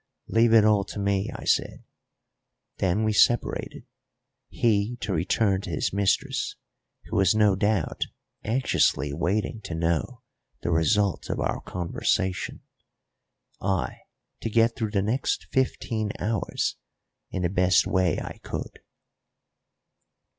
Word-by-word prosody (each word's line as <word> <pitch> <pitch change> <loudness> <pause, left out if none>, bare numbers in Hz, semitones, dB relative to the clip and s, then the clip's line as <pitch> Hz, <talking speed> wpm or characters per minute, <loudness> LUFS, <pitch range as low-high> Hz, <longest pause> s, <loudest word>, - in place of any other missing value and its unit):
"Leave 115 +1 +3
it 110 -2 +7
all 105 -2 +4
to 100 - -9
me," 100 -1 0
I - - -8
said; - - 0 0.9
then 95 +3 +1
we 110 0 +1
separated, 120 +3 +1 0.6
he 110 0 +1
to 100 0 -2
return 95 +3 +1
to 95 - -7
his 85 +1 -1
mistress, 100 -1 0 0.5
who - - -6
was 95 0 +4
no 105 -2 +4
doubt 100 -3 0 0.4
anxiously 110 - +1
waiting 100 - -1
to 95 -5 -5
know 85 - -1 0.4
the 85 - 0
result 95 +4 +1
of - - -2
our - - -1
conversation, 90 +1 -2 1.0
I 95 -1 -1 0.4
to - - -3
get 115 +1 +3
through 110 -2 -2
the 100 -2 0
next 120 +6 -1
fifteen 115 -5 -1
hours 110 -3 -1 0.5
in 90 - -3
the 85 - +2
best 90 0 +3
way 95 -1 +1
I - - -7
could. - - -6
100 Hz, 125 wpm, -26 LUFS, 90-110 Hz, 1.0 s, it